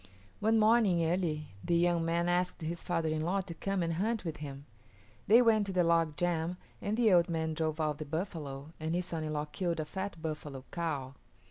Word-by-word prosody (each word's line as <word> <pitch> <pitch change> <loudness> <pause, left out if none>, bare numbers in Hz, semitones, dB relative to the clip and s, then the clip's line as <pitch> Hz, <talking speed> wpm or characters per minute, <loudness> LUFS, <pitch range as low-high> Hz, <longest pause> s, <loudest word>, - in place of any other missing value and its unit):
One 220 +2 +3
morning 215 -6 +4
early 160 -4 -1
the 170 - +1
young 170 -1 +2
man 170 +1 +1
asked 180 0 0
his 170 +2 -3
father 165 -3 0
in 155 0 -1
law 185 +5 +1
to 180 -2 -7
come 195 +1 -1
and 165 0 0
hunt 215 +5 -1
with 160 -2 -3
him. 140 -2 -7 0.6
They 230 +4 +7
went 215 -3 +4
to 195 - -3
the 180 -1 +3
log 165 -2 +2
jam 175 0 0 0.2
and 210 +2 -1
the 225 -5 +5
old 175 0 +5
man 160 -1 -1
drove 155 0 -1
out 155 -1 0
the 155 - -4
buffalo 155 -3 -5
and 160 +2 -1
his 180 0 0
son 165 -3 -3
in 155 0 -3
law 150 0 -1
killed 170 +2 -2
a 155 - -1
fat 190 +2 -5
buffalo 150 -4 -5
cow. 145 -6 -3
170 Hz, 215 wpm, -32 LUFS, 155-185 Hz, 0.6 s, They